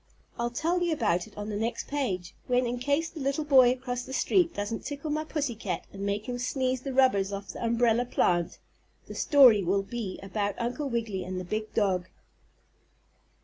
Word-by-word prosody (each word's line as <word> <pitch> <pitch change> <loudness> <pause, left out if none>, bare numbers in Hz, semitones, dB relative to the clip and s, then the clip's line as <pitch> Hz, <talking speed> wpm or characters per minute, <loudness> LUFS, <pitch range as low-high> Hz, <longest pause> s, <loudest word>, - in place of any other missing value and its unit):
I'll 235 0 0
tell 335 +9 0
you 345 -1 +1
about 205 - 0
it 215 - -19
on 205 +1 -5
the 210 - -3
next 225 +3 -2
page, 195 -12 -2
when, 250 0 +2
in 240 +1 -2
case 285 +5 +1
the 320 - -9
little 275 +2 -1
boy 260 -4 +7
across 250 -1 -3
the 265 - -8
street 345 +4 +2
doesn't 205 +2 -3
tickle 290 +1 -5
my 305 +1 0
pussy 295 -5 -2
cat 210 -4 -4
and 195 - -8
make 200 +1 -2
him 245 -1 -3
sneeze 255 0 -1
the 275 - -4
rubbers 255 -7 +3
off 200 -1 -6
the - - -6
umbrella 235 +1 +2
plant, 175 -7 +1 0.5
the - - -9
story 255 -9 +6
will 195 +3 +1
be 205 -2 -5
about 200 +1 -2
Uncle 250 +5 -2
Wiggily 225 -6 -2
and 185 +1 -4
the 185 - -6
big 215 +3 -3
dog. 185 -4 +1
235 Hz, 195 wpm, -28 LUFS, 200-270 Hz, 0.5 s, boy